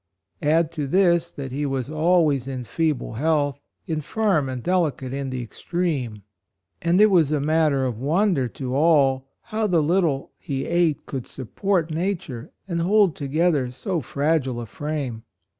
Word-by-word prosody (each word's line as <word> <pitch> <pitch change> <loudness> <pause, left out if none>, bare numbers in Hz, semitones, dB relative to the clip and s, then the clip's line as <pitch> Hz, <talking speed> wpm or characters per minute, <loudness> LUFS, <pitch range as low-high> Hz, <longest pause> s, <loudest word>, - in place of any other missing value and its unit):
Add 160 +2 +2
to 150 -4 -3
this 175 +1 +3
that 135 -2 -7
he 140 +3 -2
was 135 -3 -1
always 155 -4 +2
in 130 -2 -4
feeble 150 +3 -1
health, 145 +2 +1 0.3
in 160 -2 -2
firm 180 -5 +1
and 125 -2 -5
delicate 160 -8 0
in 140 -1 -3
the 130 -1 -3
extreme; 130 - -3 0.6
and 170 +2 +2
it 215 0 +6
was 165 -6 +4
a 150 - +2
matter 150 -2 +2
of 120 -4 -3
wonder 155 - +2
to 125 +2 -5
all 140 -4 +3 0.2
how 215 -1 -1
the 170 -5 +2
little 160 -4 +1
he 135 -1 -3
ate 170 -4 +1
could 130 -3 -5
sup 130 -4 -8
port 185 -5 +1
nature 160 -8 -3 0.2
and 170 -3 -1
hold 195 -1 +3
together 145 -1 +1
so 170 - -3
fragile 140 -2 0
a 120 - -5
frame. 140 -2 -4
150 Hz, 160 wpm, -23 LUFS, 135-170 Hz, 0.6 s, it